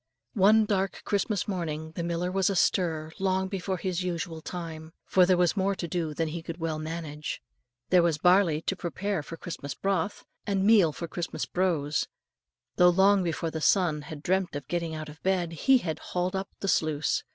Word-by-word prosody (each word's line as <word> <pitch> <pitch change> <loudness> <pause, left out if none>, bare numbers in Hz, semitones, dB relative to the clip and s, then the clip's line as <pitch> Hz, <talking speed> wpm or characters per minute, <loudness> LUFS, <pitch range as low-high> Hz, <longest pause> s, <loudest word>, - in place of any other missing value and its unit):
One 215 0 +5
dark 195 -2 -1
Christmas 205 0 0
morning 160 -5 -3
the 165 - -5
miller 170 +1 -1
was 195 +1 +2
astir 165 -4 +1
long 190 0 +1
before 190 -1 -3
his 185 0 -2
usual 170 -2 -3
time, 160 -2 -7
for 180 -1 +4
there 185 -1 +4
was 175 +1 +3
more 195 0 +1
to 175 - -4
do 160 -2 -2
than 165 0 -1
he 170 +2 -5
could 165 0 -7
well 160 -2 -2
manage. 155 -1 -5 0.5
There 180 -1 +7
was 170 -3 +2
barley 180 -2 +4
to 195 - -1
prepare 190 +1 -2
for 165 +3 -9
Christmas 145 -6 -6
broth, 195 0 -1 0.2
and 195 -1 +1
meal 205 -7 +6
for 170 +3 -6
Christmas 170 +1 -4
brose; 160 -5 0 0.7
so 180 0 +8
long 195 +2 +5
before 165 -1 -2
the 160 - -4
sun 165 -4 +3
had 145 0 -9
dreamt 185 -3 0
of 145 -3 -5
getting 170 -1 -2
out 155 0 -6
of 150 +1 -12
bed, 185 -3 0
he 260 - +4
had 165 -10 -3
hauled 180 +1 -2
up 190 0 -3
the 195 - -2
sluice. 155 -5 +1
175 Hz, 190 wpm, -28 LUFS, 160-190 Hz, 0.7 s, so